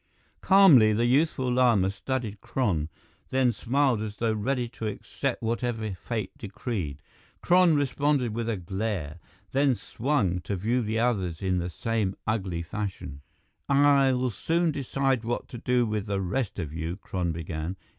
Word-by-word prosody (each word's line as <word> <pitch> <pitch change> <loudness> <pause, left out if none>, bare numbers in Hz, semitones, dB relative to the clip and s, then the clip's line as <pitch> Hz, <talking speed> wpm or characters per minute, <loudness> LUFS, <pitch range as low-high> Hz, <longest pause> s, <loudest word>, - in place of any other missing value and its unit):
Calmly, 160 - +7
the 115 +3 +1
youthful 130 0 +2
Lama 115 -7 +3
studied 110 -1 -4
Kron, 105 - -1 0.4
then 130 -2 +3
smiled 125 +1 +1
as 105 -1 -5
though 115 0 0
ready 120 +3 -1
to 115 -1 -5
accept 105 - -4
whatever 115 -2 -2
fate 105 +2 -4
decreed. 95 - -5 0.4
Kron 175 -2 +5
responded 140 -3 +1
with 115 0 -2
a 110 - -1
glare, 90 -3 -3 0.3
then 135 -1 +3
swung 110 -4 -1
to 100 - -3
view 115 +7 0
the 110 0 -2
others 100 -9 0
in 95 -1 +1
the 90 +1 -3
same 105 +1 -1
ugly 95 -6 -1
fashion. 90 -6 -5 0.5
"I'll 135 -3 +4
soon 165 +8 0
decide 135 -3 0
what 120 +1 -3
to 120 - -7
do 125 0 +2
with 105 -1 -2
the 100 -1 -1
rest 100 +5 -2
of 80 -5 -4
you," 80 +2 -3
Kron 90 -4 -3
began. 80 +2 -4
115 Hz, 150 wpm, -27 LUFS, 95-130 Hz, 0.5 s, Calmly